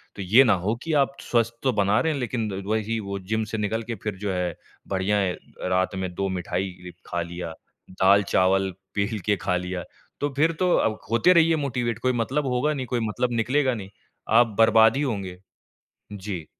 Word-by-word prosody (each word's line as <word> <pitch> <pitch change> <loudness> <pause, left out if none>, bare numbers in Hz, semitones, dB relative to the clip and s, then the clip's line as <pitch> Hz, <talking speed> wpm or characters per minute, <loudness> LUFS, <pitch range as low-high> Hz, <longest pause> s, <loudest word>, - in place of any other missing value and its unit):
तो 100 - -6
ये 110 +9 +6
ना 110 - +4
हो 110 +3 +1
कि 165 - -2
आप 135 +1 -7
स्वस्थ 115 -1 +1
तो 130 - +3
बना 100 +2 +3
रहे 160 - +1
हैं, 140 - -3
लेकिन 115 -4 -2
वही, 110 +1 -1
वो 100 -1 -4
जिम 110 +4 -2
से 110 - -2
निकल 110 +2 -1
के 115 0 -5
फिर 105 -3 -3
जो 100 0 -3
है, 90 -2 -2 0.3
बढ़िया 95 +2 0
है 95 -3 +1
अ, - - -18 0.3
रात 95 +1 +1
में 95 -1 -3
2 100 0 -1
मिठाई 90 0 -4
खा 85 0 -2
लिया। 85 -1 -6 0.4
दाल-चावल 95 0 +3 0.3
पेल 100 +2 -1
के 105 -1 +3
खा 90 - -1
लिया। 90 -1 -4 0.4
तो 145 - 0
फिर 160 +4 +3
तो 180 -1 +2
अब 110 -1 +1
होते 115 +11 +5
रहिए 165 -1 +5
मोटिवेट, 120 -6 -2
कोई 130 +1 +1
मतलब 130 +5 -1
होगा 130 +5 +1
नहीं, 130 -3 -3
कोई 125 - -1
मतलब 120 +4 -1
निकलेगा 130 +2 +1
नहीं। 100 -4 -7 0.5
आप 115 -4 +4
बर्बाद 110 +1 +6
ही - - 0
होंगे। 100 -9 -3 0.8
जी। 95 -5 -6
105 Hz, 200 wpm, -25 LUFS, 95-125 Hz, 0.8 s, ये